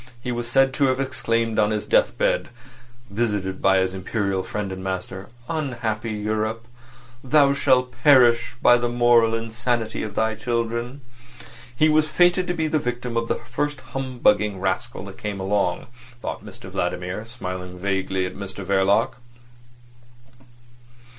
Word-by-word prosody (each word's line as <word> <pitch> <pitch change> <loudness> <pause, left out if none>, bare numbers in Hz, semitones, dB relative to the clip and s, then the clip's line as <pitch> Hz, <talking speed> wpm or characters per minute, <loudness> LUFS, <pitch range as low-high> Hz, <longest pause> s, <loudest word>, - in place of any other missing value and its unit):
He 125 +1 -4
was 120 0 -3
said 135 +2 +3
to 140 - +2
have 130 0 +1
exclaimed 115 -4 0
on 105 -1 +3
his 105 -1 -2
deathbed - - +2 0.6
(visited 100 -4 -2
by 95 0 +4
his 95 0 +1
Imperial 95 0 -1
friend 100 0 -4
and 95 0 -6
master): 95 0 -5 0.2
"Unhappy 120 -8 -2
Europe! 110 +1 -2 0.6
Thou 140 +1 +4
shalt 130 -2 +2
perish 125 -5 +5
by 120 - +7
the 120 0 0
moral 120 -1 +4
insanity 115 0 -2
of 105 -1 -5
thy 110 0 +1
children!" 115 +3 -3 0.7
He 155 +5 +4
was 155 0 +3
fated 175 +3 +3
to 175 - -1
be 160 - 0
the 155 0 +1
victim 125 -2 -4
of 115 0 0
the - - 0
first 145 +4 -3
humbugging 110 -7 +1
rascal 95 0 -2
that - - -11
came 105 -2 -4
along, 95 -2 0 0.3
thought - - -5
Mr - - -11
Vladimir, 90 +4 -3
smiling 90 -6 -6
vaguely 95 0 -1
at 90 - -5
Mr 100 -1 -7
Verloc. 100 +6 +2
115 Hz, 145 wpm, -23 LUFS, 100-125 Hz, 0.7 s, by